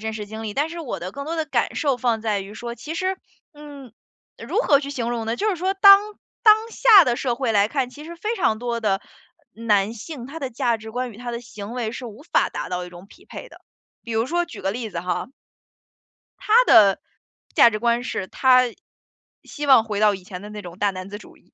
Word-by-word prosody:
真 220 0 -4
实 210 -1 -6
经 220 +1 -8
历， 210 - -5
但 290 +3 0
是 335 +1 -7
我 255 - -5
的 185 +3 -6
更 280 0 -6
多 330 +2 -4
的 320 - -1
感 310 - -1
受 280 -5 +1
放 235 -2 0
在 215 -3 -1
于 195 +2 -10
说， 235 +1 -6
其 300 +7 -7
实 375 +2 -1 0.4
嗯， 285 -4 -12 0.5
如 - - -3
何 280 -2 +4
去 280 - -6
形 240 -4 -3
容 230 -2 -3
呢？ 230 - -2
就 430 - 0
是 370 - -2
说 375 +3 -1
当 395 0 +8 0.4
当 430 -2 +8
下 435 -8 +7
的 240 -4 0
社 245 -3 -1
会 250 -3 -1
来 205 0 +3
看， 265 -1 -2
其 295 +3 -12
实 340 +2 -9
非 430 +6 -3
常 220 - +1
多 235 0 -3
的 200 -3 0 0.5
男 215 -1 0
性， 245 +2 -8
他 315 +4 -8
的 265 -3 -4
价 235 -1 0
值 220 0 -10
观 245 0 -4
与 - - -15
他 245 0 -6
的 235 - -5
行 215 -2 -9
为 235 -3 -3
是 245 +1 -7
无 220 +4 -11
法 - - +1
达 - - -5
到 180 0 -3
一 - - -12
种 175 +2 -13
匹 - - -19
配 - - -9
的。 - - -17 0.4
比 230 - -7
如 225 +2 0
说 345 +3 0
举 340 - -11
个 195 - -1
例 225 -1 -5
子 170 - -4
哈。 180 +4 -3 1.1
他 430 - -2
的 200 - +6 0.5
价 235 - +7
值 215 - -4
观 235 +1 +1
是 195 -6 -4
他 255 +3 +4 0.8
希 295 - -6
望 265 -5 +6
回 210 -2 -4
到 210 -1 +4
以 185 - -12
前 180 -1 -9
的 205 - -9
那 210 0 -8
种 175 -2 -11
大 205 0 +1
男 185 0 -8
子 205 - -7
主 210 - -16
义， - - -31
235 Hz, 260 characters per minute, -22 LUFS, 210-290 Hz, 1.1 s, 当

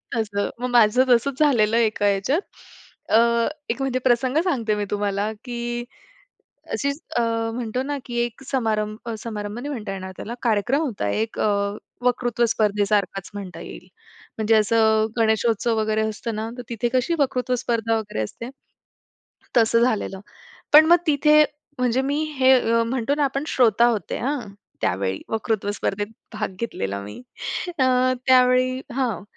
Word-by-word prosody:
तसं. 205 -3 -1
मग 250 - -2
माझं 240 +1 +5
तसंच 250 +3 +2
झालेलं 230 -7 +3
एका 215 -3 +1
ह्याच्यात. 200 - +1 0.7
अ, 220 - +5 0.5
एक 245 +4 -2
म्हणजे 260 -1 0
प्रसंग 255 +3 +2
सांगते 230 - 0
मी 205 0 -2
तुम्हाला 205 +1 -1
की 240 -1 -4 0.9
अशीच 280 +2 -2 0.2
अ, - - +3 0.3
म्हणतो 245 +1 -2
ना 285 +1 -3
की 240 - -5
एक 240 +3 -7
समारंभ 215 -5 -1
अ, 230 - -3
समारंभ 210 -1 -5
नाही 285 +4 -5
म्हणता 215 -7 -5
येणार 190 -1 -6
त्याला 235 - -6
कार्यक्रम 240 +5 +1
होता 220 - -2
एक 220 - -2
अ, - - +2 0.6
वक्तृत्व 240 -1 +1
स्पर्धे 210 -1 +1
सारखच 195 -2 -1
म्हणता 195 -3 -7
येईल. - - -10 0.5
म्हणजे 220 +1 +3
असं 220 0 +3
गणेशोत्सव 225 0 +2
वगैरे 215 0 0
असतं 220 +1 -5
ना, 220 +1 -3
तर - - -4
तिथे 235 0 -1
कशी 255 +6 +2
वक्तृत्व 255 -2 0
स्पर्धा 225 -1 0
वगैरे 210 - -4
असते. 230 - -7 1.1
तसं 230 0 +4
झालेलं. 215 -5 0 0.5
पण 305 +1 +9
मग 345 - +9
तिथे 300 +1 +5 0.3
म्हणजे 250 +1 +1
मी 290 +2 0 0.2
हे 260 0 +6 0.3
म्हणतो 255 +3 -1
ना 295 - +2
आपण 275 +1 -1
श्रोता 235 -4 +3
होते 220 -8 -1
हां 275 +2 -1 0.4
त्यावेळी. 95 +1 -1
वक्तृत्व 220 -2 -1
स्पर्धेत 205 0 -2 0.3
भाग 210 -3 -3
घेतलेला 100 - -3
मी. 105 +1 -9 0.6
अ, 260 - +4 0.4
त्यावेळी 255 0 +4
हां. 245 -7 -1
230 Hz, 150 wpm, -23 LUFS, 210-255 Hz, 1.1 s, पण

